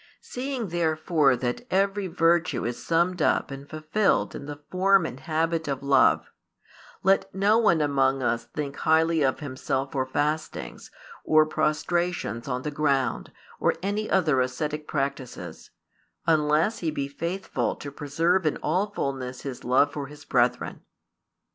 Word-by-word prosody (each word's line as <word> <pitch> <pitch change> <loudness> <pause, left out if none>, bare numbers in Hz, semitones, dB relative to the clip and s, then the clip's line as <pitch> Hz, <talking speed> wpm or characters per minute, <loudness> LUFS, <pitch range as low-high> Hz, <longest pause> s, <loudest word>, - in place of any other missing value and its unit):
Seeing 250 -4 -4
therefore 160 -4 +2
that 125 - -3
every 195 +1 +1
virtue 170 0 +1
is 120 0 -4
summed 170 +1 +1
up - - +2
and 135 +1 -8
fulfilled 155 +7 +1
in 140 - -7
the 145 0 -7
form 190 -1 +4
and 130 - -6
habit 160 +1 -1
of 140 -1 -3
love, 140 -1 +4 0.8
let 195 0 +3
no 205 +4 +4
one 175 -8 +3
among 135 -2 +2
us 115 -1 0
think 145 -2 -5
highly 160 0 +3
of 135 +1 +1
himself 135 -1 -3
for 130 -2 -1
fastings, 150 +4 -3 0.3
or 155 0 +5
prostrations 155 - -1
on 125 -1 -2
the 150 - -3
ground, 140 -3 0 0.3
or - - +2
any 205 +2 -1
other 155 -9 +3
ascetic 150 +4 -3
practices, 135 -2 -4 0.6
unless 155 +5 +2
he 165 - -1
be 140 -3 -2
faithful 170 +7 -3
to 145 - -8
preserve 165 +5 +1
in 150 - 0
all 180 +7 +1
fulness 130 -7 -4
his 135 -3 -6
love 130 +4 +3
for 145 -2 -4
his 150 +1 -13
brethren. - - 0
155 Hz, 145 wpm, -26 LUFS, 140-175 Hz, 0.8 s, or